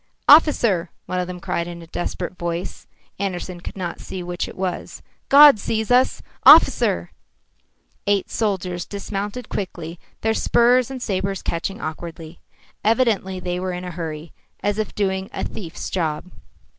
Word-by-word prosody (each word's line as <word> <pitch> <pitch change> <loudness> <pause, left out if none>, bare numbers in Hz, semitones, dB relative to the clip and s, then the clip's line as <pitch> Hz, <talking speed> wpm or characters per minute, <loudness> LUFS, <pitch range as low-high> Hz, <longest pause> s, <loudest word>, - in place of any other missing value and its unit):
"Officer!" 235 - +5 0.2
one 185 - -2
of 180 - -2
them 180 -1 -6
cried 170 0 -2
in 170 -1 -8
a - - -11
desperate 175 +2 -4
voice 170 0 -5 0.3
Andersen 185 -2 -4
could - - -8
not 175 -3 -4
see 185 -1 -6
which 175 0 -3
it - - -11
was 185 -1 -4 0.3
"God 285 -4 +9
sees 220 +1 -2
us! 250 +1 +3 0.2
Officer!" - - +6 1.0
Eight 200 -1 +2
soldiers 185 -5 -2
dismounted 205 +3 -5
quickly, 170 -3 -5 0.2
their 220 0 +1
spurs 240 +2 +3
and 260 -2 -6
sabres 195 -1 -2
catching 195 +5 -3
awkwardly. 165 -1 -7 0.4
Evidently 215 -5 +1
they 180 0 -3
were 185 0 -3
in 180 +1 -5
a 180 - -5
hurry, 165 -2 -6 0.3
as 205 +1 0
if 215 - -3
doing 190 -1 -1
a - - -3
thief's 175 -7 -6
job. 165 0 -2
185 Hz, 150 wpm, -22 LUFS, 175-210 Hz, 1.0 s, God